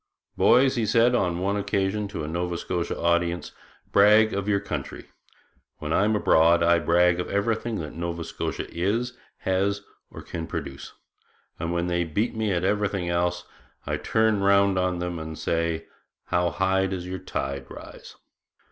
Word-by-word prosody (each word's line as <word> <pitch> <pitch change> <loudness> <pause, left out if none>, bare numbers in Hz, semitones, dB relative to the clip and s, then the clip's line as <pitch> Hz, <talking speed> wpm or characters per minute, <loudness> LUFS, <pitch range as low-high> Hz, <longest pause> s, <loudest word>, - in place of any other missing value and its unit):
'Boys,' 130 +1 +4
he 115 - +1
said 115 +3 +4
on 90 -8 +1
one 95 +3 0
occasion 100 0 -1
to 100 - -5
a - - -4
Nova 85 +2 -2
Scotia 90 0 -3
audience, 85 0 0 0.4
'brag 105 +2 +5
of 100 0 -2
your 100 -1 +3
country. 100 - -6 0.7
When 75 +1 -3
I'm 105 +2 +3
abroad 85 -4 +4
I 85 0 +4
brag 85 +1 +3
of 90 - -3
everything 110 +3 -1
that 75 -2 -7
Nova 85 0 -4
Scotia - - -4
is, 110 +8 -1 0.3
has, 100 +2 0 0.3
or - - -10
can 80 -1 -6
produce; 70 -4 -6 0.7
and 85 +1 -2
when 85 0 0
they 85 0 0
beat 100 +9 -1
me 110 -2 0
at 90 -1 0
everything 100 -3 0
else, 90 0 0 0.4
I - - -1
turn 110 -2 +1
round 100 -1 +4
on 90 -1 0
them 90 -1 -3
and 80 0 -6
say, 85 -1 -1 0.4
"How 90 0 +1
high 95 +1 +1
does 95 -2 -4
your 95 +1 -5
tide 70 -6 -4
rise?"' - - -11
90 Hz, 165 wpm, -25 LUFS, 85-100 Hz, 0.7 s, brag